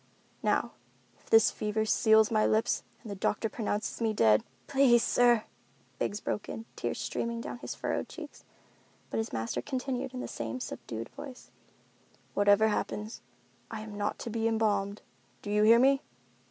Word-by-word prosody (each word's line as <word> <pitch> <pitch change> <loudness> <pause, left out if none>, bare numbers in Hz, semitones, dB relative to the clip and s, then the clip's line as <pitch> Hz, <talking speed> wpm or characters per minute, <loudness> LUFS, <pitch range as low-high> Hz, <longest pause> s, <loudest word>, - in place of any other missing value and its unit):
Now, - - +1 0.5
if - - -23
this 225 -2 +6
fever 215 +1 -1
seals 220 0 +4
my 215 -1 +3
lips 220 +1 +2 0.2
and 220 - -7
the - - -4
doctor 210 +3 0
pronounces 215 0 -3
me 225 -1 +1
dead——" 110 - +4 0.2
"Please, 265 -4 +4
sir," 240 -2 +4 0.6
Biggs 205 - -1
broke 210 - -3
in, 225 - -6
tears - - -3
streaming 235 0 -2
down 240 - -6
his - - -6
furrowed - - -2
cheeks, 305 -4 -10 0.7
but - - -1
his 225 - -3
master 115 0 -2
continued 260 -2 -3
in - - -4
the - - -4
same 255 - -4
subdued 115 - -6
voice, 265 -3 -10 0.8
"Whatever 205 +2 +4
happens, 210 +1 -3 0.5
I 220 -1 -5
am 215 -1 -8
not 205 0 -2
to 230 - -6
be 225 0 0
embalmed—do 200 - -2
you 210 0 +3
hear 225 +2 +7
me? 270 +2 +4
220 Hz, 160 wpm, -30 LUFS, 205-235 Hz, 0.8 s, hear